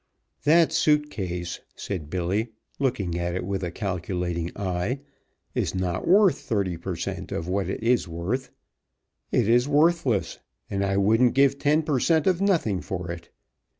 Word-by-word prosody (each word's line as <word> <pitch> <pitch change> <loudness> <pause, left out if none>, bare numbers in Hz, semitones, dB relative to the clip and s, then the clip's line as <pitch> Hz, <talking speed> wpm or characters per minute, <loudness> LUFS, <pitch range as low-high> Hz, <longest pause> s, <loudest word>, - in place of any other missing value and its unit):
"That 165 +2 +5
suit 150 -1 +2
case," 90 -4 -4 0.2
said 85 -7 -5
Billy, 95 +6 -1 0.3
looking 100 -10 -1
at 85 0 -2
it 90 - -3
with 95 0 -2
a 90 - -1
calculating 90 -3 -3
eye, 95 +7 -2 0.5
"is - - -1
not 95 -1 -2
worth 195 +1 +5
thirty 100 -10 -1
per 85 +2 -5
cent. - - -5
of 80 - -3
what 95 0 -1
it 100 - -4
is 120 -3 +2
worth. 90 +11 -3 0.8
It 115 - +2
is 120 +3 +4
worthless, 145 - +2 0.3
and 100 0 0
I 100 0 0
wouldn't 110 +5 +3
give 140 0 +4
ten 150 +2 +3
per 150 -4 0
cent. 160 +2 +2
of 185 -1 +2
nothing 165 - +1
for 90 -2 -4
it. 85 -1 -8
100 Hz, 160 wpm, -25 LUFS, 90-140 Hz, 0.8 s, That